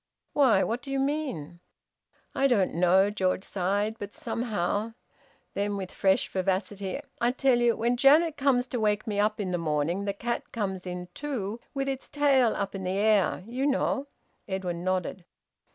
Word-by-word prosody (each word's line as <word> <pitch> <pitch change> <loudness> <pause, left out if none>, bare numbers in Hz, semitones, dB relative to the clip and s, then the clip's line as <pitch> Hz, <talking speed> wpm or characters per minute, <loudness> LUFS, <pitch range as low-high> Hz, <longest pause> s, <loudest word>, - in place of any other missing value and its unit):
"Why? 270 -6 +4
What 235 +2 -2
do 275 - -10
you 275 - 0
mean?" 270 - -2 0.7
"I 275 - +3
don't 210 -8 +2
know!" 185 +4 +4
George 190 -2 0
sighed. 205 +4 -1
"But 205 0 -7
somehow 220 -1 -2 0.3
" - - -36
Then, 205 0 -1
with 190 -2 -5
fresh 190 -1 +2
vivacity: 190 +1 -2 0.2
"I 240 - +4
tell 255 -1 +2
you 240 -1 +3
when 235 +2 +1
Auntie 245 - -1
Janet 310 +3 +6
comes 265 -3 +2
to 245 - -2
wake 210 0 +1
me 210 -3 -2
up 210 +1 +1
in 190 -3 -2
the 175 - 0
morning 165 +4 -1
the 200 - -1
cat 235 +4 -4
comes 190 -6 -3
in 180 0 -5
too, 240 -7 -4 0.2
with 275 0 -1
its 270 -1 -4
tail 275 -5 +3
up 200 -1 -3
in 195 -1 -5
the 185 +1 -1
air 205 -3 +2
you 255 +5 -1
know!" 275 0 0 0.4
Edwin 180 -3 -3
nodded. 185 0 -1
205 Hz, 180 wpm, -28 LUFS, 190-250 Hz, 0.7 s, Janet